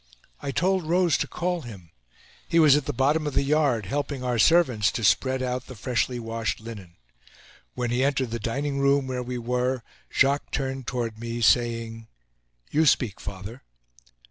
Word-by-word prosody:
I 140 Hz, -, -4 dB
told 185 Hz, +3 st, +1 dB
Rose 175 Hz, -3 st, +3 dB
to -, -, -1 dB
call 175 Hz, 0 st, -2 dB
him. 95 Hz, -, -11 dB, 0.6 s
He 170 Hz, -, +2 dB
was 155 Hz, -4 st, +7 dB
at 150 Hz, -2 st, 0 dB
the -, -, -1 dB
bottom 145 Hz, +4 st, +1 dB
of 145 Hz, -, -4 dB
the -, -, +3 dB
yard, 140 Hz, -7 st, +2 dB
helping 140 Hz, +4 st, -3 dB
our 125 Hz, -2 st, 0 dB
servants 125 Hz, -8 st, +4 dB
to 115 Hz, -, -3 dB
spread 130 Hz, +5 st, +2 dB
out 125 Hz, 0 st, -3 dB
the 130 Hz, -, -9 dB
freshly 120 Hz, +2 st, -1 dB
washed 115 Hz, -1 st, -3 dB
linen. 105 Hz, -6 st, -10 dB, 0.8 s
When 120 Hz, -1 st, -2 dB
he 125 Hz, +2 st, +1 dB
entered 135 Hz, -4 st, 0 dB
the 115 Hz, -, -3 dB
dining 140 Hz, +6 st, -2 dB
room, 140 Hz, 0 st, +3 dB
where 130 Hz, -1 st, -3 dB
we 125 Hz, 0 st, -4 dB
were, 125 Hz, +1 st, -1 dB, 0.3 s
Jacques 140 Hz, +1 st, +2 dB
turned 135 Hz, -2 st, -3 dB
toward 115 Hz, -3 st, -3 dB
me, 115 Hz, 0 st, -4 dB
saying: 115 Hz, -1 st, +1 dB, 0.6 s
"You 155 Hz, +1 st, +3 dB
speak, 115 Hz, -7 st, +2 dB
father." 100 Hz, +5 st, -8 dB
125 Hz, 170 wpm, -25 LUFS, 115-140 Hz, 0.8 s, was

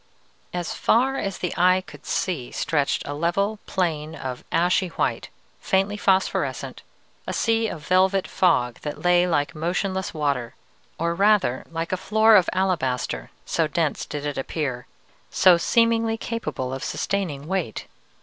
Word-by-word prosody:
"As 175 Hz, -1 st, -3 dB
far 265 Hz, +4 st, +2 dB
as 195 Hz, -1 st, -3 dB
the 180 Hz, -, -3 dB
eye 185 Hz, +1 st, +4 dB
could -, -, -13 dB
see 150 Hz, -10 st, -1 dB
stretched 145 Hz, -3 st, 0 dB
a 145 Hz, -, -3 dB
level 195 Hz, +7 st, 0 dB
plain 160 Hz, -4 st, -1 dB
of 130 Hz, -4 st, -6 dB
ashy 180 Hz, +2 st, +2 dB
white, 170 Hz, -, -2 dB, 0.3 s
faintly 195 Hz, +2 st, +1 dB
phosphorescent, 190 Hz, -2 st, 0 dB, 0.5 s
a -, -, -2 dB
sea 225 Hz, -1 st, +1 dB
of 155 Hz, -8 st, -7 dB
velvet 190 Hz, +1 st, +3 dB
fog 125 Hz, -10 st, +1 dB
that 150 Hz, +3 st, -6 dB
lay 175 Hz, 0 st, +4 dB
like 145 Hz, -4 st, 0 dB
motionless 185 Hz, +4 st, -2 dB
water, 140 Hz, -6 st, -2 dB, 0.4 s
or 170 Hz, +1 st, 0 dB
rather 195 Hz, -8 st, +2 dB
like 165 Hz, 0 st, -4 dB
a 185 Hz, -, 0 dB
floor 220 Hz, +3 st, +4 dB
of 185 Hz, -4 st, +5 dB
alabaster, 130 Hz, -, -1 dB, 0.2 s
so -, -, +1 dB
dense -, -, -1 dB
did 145 Hz, 0 st, -5 dB
it 145 Hz, -2 st, -2 dB
appear, 130 Hz, -3 st, -3 dB, 0.4 s
so 185 Hz, -2 st, +6 dB
seemingly 230 Hz, +4 st, +2 dB
capable 225 Hz, -, -4 dB
of 135 Hz, -, -5 dB
sustaining 170 Hz, -8 st, -2 dB
weight. 175 Hz, -, -3 dB
180 Hz, 145 wpm, -24 LUFS, 150-195 Hz, 0.5 s, so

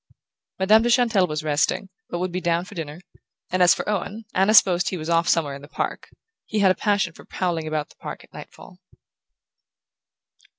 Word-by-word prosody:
Madame 210 Hz, +4 st, +5 dB
de 240 Hz, -, 0 dB
Chantelle 230 Hz, -6 st, +3 dB
was 150 Hz, -1 st, -4 dB
resting, 150 Hz, +5 st, 0 dB, 0.2 s
but 175 Hz, -, -3 dB
would 180 Hz, +1 st, -2 dB
be 185 Hz, +1 st, -3 dB
down 170 Hz, 0 st, 0 dB
for 185 Hz, -, -12 dB
dinner; 160 Hz, -2 st, -7 dB, 0.5 s
and 185 Hz, 0 st, 0 dB
as 180 Hz, -, +6 dB
for -, -, -5 dB
Owen, 210 Hz, +2 st, -3 dB
Anna 195 Hz, +4 st, +3 dB
supposed 180 Hz, -3 st, +5 dB
he 185 Hz, -, -4 dB
was 160 Hz, +1 st, -4 dB
off 170 Hz, 0 st, +2 dB
somewhere 150 Hz, -4 st, +1 dB
in 140 Hz, -, -9 dB
the 145 Hz, -, -12 dB
park -, -, -4 dB, 0.4 s
he 215 Hz, -, -3 dB
had 195 Hz, -2 st, +5 dB
a -, -, +4 dB
passion 200 Hz, -4 st, 0 dB
for -, -, -14 dB
prowling 170 Hz, -4 st, -3 dB
about 155 Hz, -1 st, -2 dB
the -, -, -20 dB
park -, -, -8 dB
at -, -, -22 dB
nightfall... -, -, -12 dB
180 Hz, 200 wpm, -23 LUFS, 165-200 Hz, 0.5 s, as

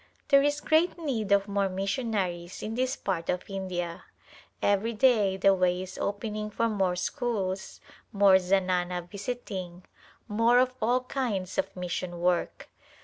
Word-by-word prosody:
There 275 Hz, -1 st, +7 dB
is 290 Hz, +1 st, +1 dB
great 325 Hz, +4 st, +2 dB
need 250 Hz, -, -2 dB
of 200 Hz, 0 st, +4 dB
more 200 Hz, -1 st, 0 dB
missionaries 190 Hz, -3 st, -2 dB
in 220 Hz, -, -3 dB
this 255 Hz, +3 st, 0 dB
part 180 Hz, -9 st, -3 dB
of 180 Hz, -, -1 dB
India. 180 Hz, -3 st, -4 dB, 0.5 s
Every 205 Hz, +3 st, +1 dB
day 215 Hz, -5 st, +3 dB
the 195 Hz, +1 st, +5 dB
way 180 Hz, -1 st, +1 dB
is 185 Hz, 0 st, -9 dB
opening 210 Hz, +1 st, -3 dB
for 230 Hz, +2 st, 0 dB
more 195 Hz, -5 st, 0 dB
schools, 190 Hz, -1 st, -3 dB, 0.3 s
more 200 Hz, -2 st, +6 dB
zanana 180 Hz, -1 st, 0 dB
visiting, 195 Hz, -4 st, -6 dB, 0.4 s
more 230 Hz, +3 st, +3 dB
of 255 Hz, 0 st, +3 dB
all 245 Hz, +3 st, +2 dB
kinds 230 Hz, -8 st, -2 dB
of 195 Hz, -, -2 dB
mission 180 Hz, -1 st, -4 dB
work. 175 Hz, 0 st, 0 dB
200 Hz, 145 wpm, -28 LUFS, 185-230 Hz, 0.5 s, There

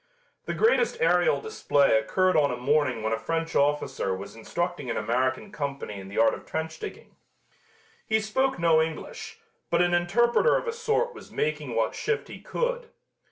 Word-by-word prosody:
The -, -, -3 dB
greatest 470 Hz, +1 st, +3 dB
aerial 485 Hz, 0 st, +3 dB
display 145 Hz, -, +2 dB
occurred 185 Hz, +12 st, +2 dB
on 145 Hz, -2 st, +4 dB
a -, -, -3 dB
morning 130 Hz, -3 st, +1 dB
when 110 Hz, 0 st, 0 dB
a 110 Hz, -, -1 dB
French 165 Hz, +6 st, -2 dB
officer 145 Hz, -9 st, +1 dB
was 95 Hz, +3 st, -9 dB
instructing 170 Hz, +4 st, -3 dB
an -, -, -1 dB
American 130 Hz, -, -1 dB
company 140 Hz, -, -4 dB
in 95 Hz, -, -9 dB
the 100 Hz, -, -8 dB
art 115 Hz, -, +5 dB
of -, -, -7 dB
trench 160 Hz, 0 st, -4 dB
digging. 425 Hz, -1 st, -9 dB, 0.9 s
He 220 Hz, -, +3 dB
spoke 260 Hz, +5 st, 0 dB
no 165 Hz, -2 st, +4 dB
English, 160 Hz, -1 st, -5 dB, 0.3 s
but 170 Hz, -, +2 dB
an 175 Hz, 0 st, +1 dB
interpreter 235 Hz, -, +3 dB
of -, -, -4 dB
a 460 Hz, -, -1 dB
sort 465 Hz, +1 st, 0 dB
was -, -, -12 dB
making 150 Hz, -5 st, -2 dB
what 115 Hz, -1 st, +1 dB
shift 445 Hz, +1 st, -2 dB
he -, -, -9 dB
could. -, -, -2 dB
160 Hz, 175 wpm, -26 LUFS, -, 0.9 s, art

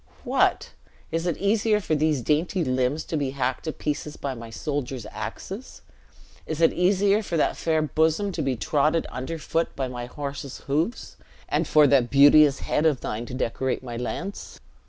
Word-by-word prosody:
"What? -, -, +1 dB, 0.4 s
is 165 Hz, +2 st, -1 dB
it 170 Hz, -, -1 dB
easier 210 Hz, +2 st, +2 dB
for 185 Hz, -, -2 dB
these 150 Hz, -4 st, +1 dB
dainty 165 Hz, -, +1 dB
limbs 130 Hz, +2 st, 0 dB
to -, -, -4 dB
be 140 Hz, -3 st, 0 dB
hacked 130 Hz, +2 st, -1 dB
to 160 Hz, -, -1 dB
pieces 150 Hz, 0 st, -4 dB
by 140 Hz, -2 st, -3 dB
my 115 Hz, -2 st, -9 dB
soldiers' 135 Hz, -2 st, -4 dB
axes? -, -, -7 dB, 0.6 s
Is 160 Hz, -1 st, -3 dB
it 165 Hz, -, +4 dB
easier 195 Hz, +3 st, +3 dB
for 175 Hz, -5 st, -3 dB
that -, -, +2 dB
fair 160 Hz, -1 st, +1 dB
bosom 160 Hz, +7 st, +1 dB
to 170 Hz, -, -3 dB
be 135 Hz, -3 st, 0 dB
trodden 150 Hz, +8 st, +1 dB
underfoot 165 Hz, +5 st, -3 dB
by 135 Hz, -, -2 dB
my 120 Hz, -1 st, -6 dB
horse's 140 Hz, 0 st, -6 dB
hoofs, 160 Hz, -, -2 dB, 0.3 s
and -, -, 0 dB
for 150 Hz, -1 st, +6 dB
that 130 Hz, -3 st, +4 dB
beauteous 145 Hz, 0 st, +6 dB
head 155 Hz, -, +1 dB
of 145 Hz, -6 st, +1 dB
thine 115 Hz, +3 st, -4 dB
to 125 Hz, -, -6 dB
decorate 130 Hz, +1 st, -2 dB
my 120 Hz, -2 st, -6 dB
lance? 170 Hz, +11 st, -5 dB
150 Hz, 175 wpm, -25 LUFS, 130-165 Hz, 0.6 s, for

